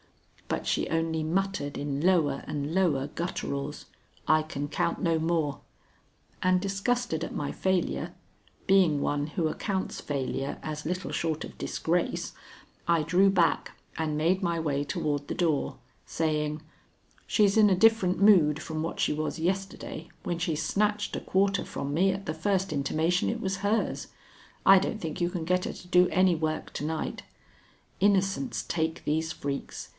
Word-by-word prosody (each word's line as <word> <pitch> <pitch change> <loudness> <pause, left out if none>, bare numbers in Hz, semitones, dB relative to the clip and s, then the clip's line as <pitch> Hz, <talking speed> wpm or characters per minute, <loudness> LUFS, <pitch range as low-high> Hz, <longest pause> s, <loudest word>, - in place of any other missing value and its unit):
But - - -2
she - - 0
only 165 -1 0
muttered 175 -3 -1
in 145 -1 -2
lower 160 -6 +2
and 145 +1 -3
lower 160 -8 +2
gutturals, 150 -3 -4 0.4
"I 155 0 +5
can 145 -2 -4
count 170 - -1
no 165 -4 +2
more"; 160 -3 0 0.8
and, 185 0 +4
disgusted 200 -2 -1
at - - -5
my 145 - -2
failure, 190 -2 -1 0.5
being 185 -6 +4
one 145 +1 0
who 160 +1 -1
accounts 190 +4 -3
failure 135 -1 -3
as 150 -1 -5
little 180 +3 -3
short 160 -2 -1
of - - -12
disgrace, 175 +2 -1 0.5
I 170 -2 +3
drew 185 +5 +4
back 185 -3 +1 0.2
and 155 -2 -1
made 175 +5 +2
my 170 -2 0
way 145 -3 0
toward 145 0 -2
the - - -2
door, 160 -5 0 0.3
saying: 150 -1 -1 0.7
"She's 205 -3 +3
in 215 -2 +6
a 190 - +4
different 210 -2 +4
mood 170 -8 +5
from 155 -1 -4
what 165 - -4
she - - +2
was 155 +2 -3
yesterday 185 -2 -3
when 170 -1 -2
she 165 -2 0
snatched 205 +7 0
a - - -3
quarter 195 +1 +1
from 140 +1 -4
me 190 +5 +3
at 195 +1 -5
the 155 - -2
first 190 +2 0
intimation 155 +5 +1
it 230 - -2
was 195 -3 -2
hers. 205 +3 0 0.6
I 195 0 +9
don't 205 +3 -3
think 160 -3 -5
you 175 - +2
can 175 -3 -4
get 180 +1 +1
her - - -3
to 180 - -12
do 180 0 +5
any 185 -1 +4
work 155 -1 -3
to - - -4
night. 160 +1 -3 0.8
Innocents 200 +5 +2
take 160 -1 -2
these 160 +2 0
freaks. 140 -3 -5
165 Hz, 160 wpm, -28 LUFS, 155-190 Hz, 0.8 s, I